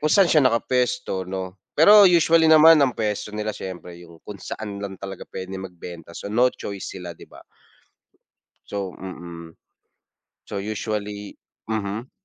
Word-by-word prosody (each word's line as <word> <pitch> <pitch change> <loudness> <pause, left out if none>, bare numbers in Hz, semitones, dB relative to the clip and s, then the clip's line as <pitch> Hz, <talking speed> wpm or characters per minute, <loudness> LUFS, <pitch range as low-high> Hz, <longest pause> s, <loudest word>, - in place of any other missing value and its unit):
kung 155 - +1
saan 195 +4 +6
siya 155 - +6
nakapuwesto, 125 -6 0
'no? 95 0 -6 0.2
Pero 205 +6 +8
usually 165 -1 +4
naman 160 0 +8
ang 135 -4 +2
puwesto 105 -1 -3
nila 105 0 -2
siyempre 90 -3 -8
yung 85 -1 -14
kung 105 -1 -9
saan 105 0 -6
lang 100 -1 -5
talaga 95 0 -8
pwede 95 0 -6
magbenta. 85 -3 -10
So, 100 - -7
no 120 +3 +4
choice 100 -5 -7
sila, 90 -2 -7
'di - - -13
ba? - - -15 1.2
So 100 -2 -4
mm. 85 -3 -9 0.9
So, 100 - -6
usually 105 0 -4 0.3
mhm. 110 +3 -3
100 Hz, 145 wpm, -23 LUFS, 95-125 Hz, 1.2 s, Pero